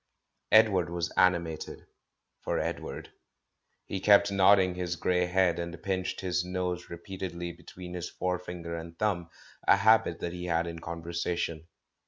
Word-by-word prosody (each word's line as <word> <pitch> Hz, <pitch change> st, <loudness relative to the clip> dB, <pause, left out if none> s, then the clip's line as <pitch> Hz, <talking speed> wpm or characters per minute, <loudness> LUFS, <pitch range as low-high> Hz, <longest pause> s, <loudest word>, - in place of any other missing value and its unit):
Edward 105 Hz, -6 st, +5 dB
was 85 Hz, 0 st, -2 dB
animated 85 Hz, -4 st, 0 dB, 0.3 s
— -, -, -54 dB
for -, -, -1 dB
Edward. -, -, -4 dB, 0.7 s
He 95 Hz, -, -4 dB
kept 100 Hz, +1 st, +5 dB
nodding 95 Hz, -1 st, +5 dB
his 90 Hz, -1 st, -3 dB
grey 90 Hz, 0 st, +1 dB
head, 90 Hz, -1 st, +2 dB
and 85 Hz, 0 st, -5 dB
pinched 95 Hz, -2 st, -2 dB
his 90 Hz, -1 st, 0 dB
nose 90 Hz, -1 st, -3 dB
re 85 Hz, -, -6 dB
peatedly 85 Hz, -1 st, -6 dB
between 90 Hz, +1 st, -10 dB
his 90 Hz, -1 st, -4 dB
forefinger 90 Hz, -2 st, -4 dB
and 85 Hz, 0 st, -8 dB
thumb, 90 Hz, -6 st, -1 dB, 0.4 s
a -, -, +7 dB
habit 110 Hz, +3 st, +4 dB
that 85 Hz, -, -3 dB
he 90 Hz, 0 st, -5 dB
had 85 Hz, -1 st, +1 dB
in 85 Hz, -1 st, -6 dB
conversation. 85 Hz, 0 st, -3 dB
90 Hz, 150 wpm, -29 LUFS, 85-95 Hz, 0.7 s, a